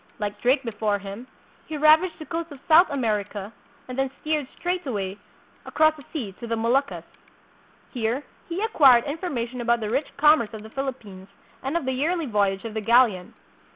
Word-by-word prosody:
Like 205 Hz, -1 st, -4 dB
Drake 260 Hz, +3 st, +3 dB
before 210 Hz, -3 st, -1 dB
him, 200 Hz, +5 st, -9 dB, 0.4 s
he 310 Hz, -, -4 dB
ravaged 315 Hz, +4 st, +4 dB
the 310 Hz, -, -9 dB
coast 330 Hz, 0 st, -4 dB
of 285 Hz, -, -10 dB
South 335 Hz, +3 st, +7 dB
America 210 Hz, -5 st, -2 dB, 0.3 s
and 255 Hz, -, -6 dB
then 270 Hz, 0 st, +1 dB
steered 305 Hz, -3 st, -1 dB
straight 360 Hz, 0 st, -2 dB
away 200 Hz, -4 st, -3 dB, 0.4 s
across 310 Hz, 0 st, +3 dB
the 295 Hz, -, -13 dB
sea 250 Hz, -, -4 dB
to 235 Hz, -, -7 dB
the 230 Hz, -, -1 dB
Moluccas. 245 Hz, +5 st, 0 dB, 0.9 s
Here 240 Hz, +2 st, -2 dB, 0.3 s
he 355 Hz, +5 st, -2 dB
acquired 270 Hz, -, +6 dB
information 260 Hz, -6 st, -4 dB
about 235 Hz, 0 st, +2 dB
the 215 Hz, -1 st, -3 dB
rich 270 Hz, +5 st, 0 dB
commerce 295 Hz, -7 st, +4 dB
of 215 Hz, -, -9 dB
the 220 Hz, -, -12 dB
Philippines 230 Hz, -9 st, -6 dB, 0.3 s
and 275 Hz, +5 st, -1 dB
of 340 Hz, -, -4 dB
the 260 Hz, -, 0 dB
yearly 315 Hz, +6 st, 0 dB
voyage 200 Hz, -4 st, 0 dB
of 225 Hz, -, -5 dB
the 220 Hz, -, -2 dB
galleon. 225 Hz, -5 st, +3 dB
255 Hz, 180 wpm, -24 LUFS, 215-305 Hz, 0.9 s, South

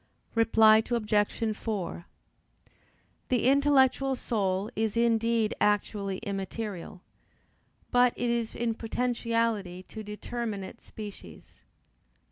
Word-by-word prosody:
Reply 225 Hz, -1 st, +6 dB
Obj. 215 Hz, -1 st, 0 dB
4: 200 Hz, -6 st, -4 dB, 1.2 s
The 245 Hz, -2 st, +1 dB
intellectual 270 Hz, -1 st, +4 dB
soul 200 Hz, -4 st, -1 dB
is 220 Hz, +1 st, -1 dB
indeed 230 Hz, -1 st, +2 dB
actually 205 Hz, -1 st, +1 dB
immaterial, 195 Hz, -2 st, -5 dB, 0.9 s
but 245 Hz, 0 st, +4 dB
it 240 Hz, -1 st, 0 dB
is 235 Hz, -1 st, -2 dB
in 235 Hz, -1 st, 0 dB
potentiality 230 Hz, -5 st, -1 dB
to 220 Hz, -, -9 dB
determinate 210 Hz, -1 st, -5 dB
species. 205 Hz, -, -11 dB
225 Hz, 90 wpm, -28 LUFS, 205-235 Hz, 1.2 s, Reply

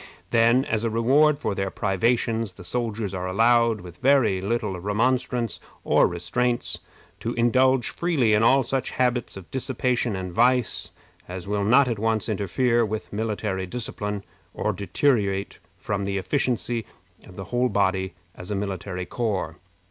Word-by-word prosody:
Then, 115 Hz, +3 st, +4 dB
as 110 Hz, 0 st, -1 dB
a 115 Hz, -, +1 dB
reward 135 Hz, +7 st, +4 dB
for 140 Hz, -, -2 dB
their 95 Hz, 0 st, -2 dB
privations, 115 Hz, +2 st, 0 dB
the 90 Hz, -, -12 dB
soldiers 110 Hz, -1 st, -2 dB
are 90 Hz, -1 st, -3 dB
allowed, 115 Hz, +2 st, +3 dB
with 90 Hz, -1 st, -11 dB
very 125 Hz, -6 st, +3 dB
little 105 Hz, -2 st, -2 dB
remonstrance 120 Hz, +4 st, 0 dB, 0.2 s
or -, -, +4 dB
restraint, 120 Hz, +8 st, -1 dB, 0.4 s
to 115 Hz, -, -3 dB
indulge 130 Hz, +1 st, +3 dB
freely 145 Hz, -11 st, +1 dB
in 105 Hz, -, +4 dB
all 135 Hz, +4 st, +5 dB
such 135 Hz, +1 st, -1 dB
habits 125 Hz, -4 st, -1 dB
of 95 Hz, -3 st, -12 dB
dissipation 125 Hz, -3 st, -1 dB
and 95 Hz, -1 st, -4 dB
vice 125 Hz, +2 st, +2 dB, 0.4 s
as 90 Hz, +1 st, -6 dB
will 100 Hz, 0 st, 0 dB
not 130 Hz, +6 st, +5 dB
at 115 Hz, -4 st, -2 dB
once 110 Hz, -1 st, 0 dB
interfere 115 Hz, +4 st, +1 dB
with 110 Hz, -1 st, -4 dB
military 105 Hz, -3 st, -2 dB
discipline, 105 Hz, -2 st, -4 dB, 0.3 s
or -, -, -1 dB
deteriorate 100 Hz, -3 st, 0 dB, 0.2 s
from 100 Hz, -1 st, -3 dB
the 100 Hz, 0 st, -1 dB
efficiency 120 Hz, +1 st, -1 dB, 0.4 s
of 90 Hz, -, -13 dB
the 95 Hz, -, -6 dB
whole 125 Hz, +1 st, +2 dB
body 95 Hz, -2 st, 0 dB, 0.2 s
as 90 Hz, -, -10 dB
a 105 Hz, -, -1 dB
military 95 Hz, -2 st, -4 dB
corps. 95 Hz, -7 st, -2 dB
110 Hz, 150 wpm, -24 LUFS, 95-125 Hz, 0.4 s, all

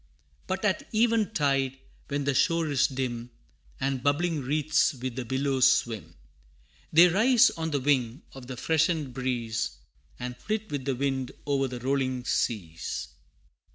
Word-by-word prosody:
But 190 Hz, +2 st, -2 dB
at 195 Hz, -, 0 dB
even 225 Hz, -1 st, +2 dB
tide, 135 Hz, -6 st, +1 dB, 0.3 s
when 145 Hz, 0 st, -2 dB
the 140 Hz, 0 st, +1 dB
shore 165 Hz, +3 st, +2 dB
is 140 Hz, 0 st, +3 dB
dim, 125 Hz, -4 st, -4 dB, 0.5 s
And 135 Hz, -1 st, -1 dB
bubbling 150 Hz, +3 st, +1 dB
wreaths 150 Hz, +2 st, +1 dB
with 125 Hz, -1 st, -5 dB
the 130 Hz, -2 st, -4 dB
billows 130 Hz, +1 st, +3 dB
swim, 115 Hz, -4 st, -2 dB, 0.8 s
They 170 Hz, +3 st, +8 dB
rise 235 Hz, +7 st, +5 dB
on 160 Hz, -1 st, -3 dB
the 145 Hz, -2 st, 0 dB
wing 130 Hz, -1 st, 0 dB
of 130 Hz, -2 st, -10 dB
the 130 Hz, -1 st, -6 dB
freshened 160 Hz, -2 st, +1 dB
breeze, 115 Hz, -3 st, -2 dB, 0.4 s
And 125 Hz, 0 st, -5 dB
flit 215 Hz, -, -4 dB
with 140 Hz, -3 st, -3 dB
the 135 Hz, -2 st, 0 dB
wind 135 Hz, -1 st, -2 dB
o'er 140 Hz, -2 st, +1 dB
the 125 Hz, -1 st, -7 dB
rolling 130 Hz, -1 st, 0 dB
seas. 85 Hz, -11 st, -2 dB
135 Hz, 150 wpm, -27 LUFS, 125-160 Hz, 0.8 s, They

